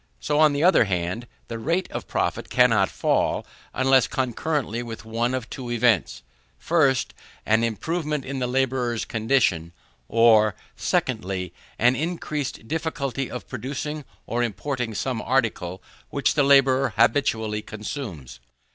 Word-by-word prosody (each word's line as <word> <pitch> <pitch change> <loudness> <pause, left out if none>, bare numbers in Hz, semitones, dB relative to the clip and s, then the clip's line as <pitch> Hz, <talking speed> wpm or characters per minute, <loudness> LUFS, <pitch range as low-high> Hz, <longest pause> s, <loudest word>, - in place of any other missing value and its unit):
So, 150 - 0
on 155 -2 +6
the 145 +2 0
other 180 -9 +6
hand, 90 +5 -2 0.2
the 115 - -5
rate 170 +9 0
of - - -5
profit - - -2
cannot 115 -6 +4
fall, - - 0 0.3
unless 130 -1 +3
concurrently 130 -1 -2
with 115 -2 -8
one 115 +3 -1
of 125 -3 -4
two 125 0 -7
events: 110 - +1 0.4
1st, 140 -7 +2 0.4
an 110 +1 +3
improvement 150 - -2
in 135 0 -4
the 125 - 0
labourer's 125 -2 0
condition; 110 -8 +1 0.3
or, 110 -3 +5 0.2
2ndly, 90 -1 -1 0.3
an 125 +2 +4
increased 150 -6 -3
difficulty 140 -4 -2
of 125 - -7
producing 145 +3 -4 0.2
or 120 +2 -1
importing 120 +1 -2
some 125 -1 -2
article 110 -7 -1 0.3
which 140 - +1
the 145 - +2
labourer 135 -1 +4
habitually 110 -3 +2
consumes. 105 - -7
125 Hz, 130 wpm, -24 LUFS, 110-140 Hz, 0.4 s, on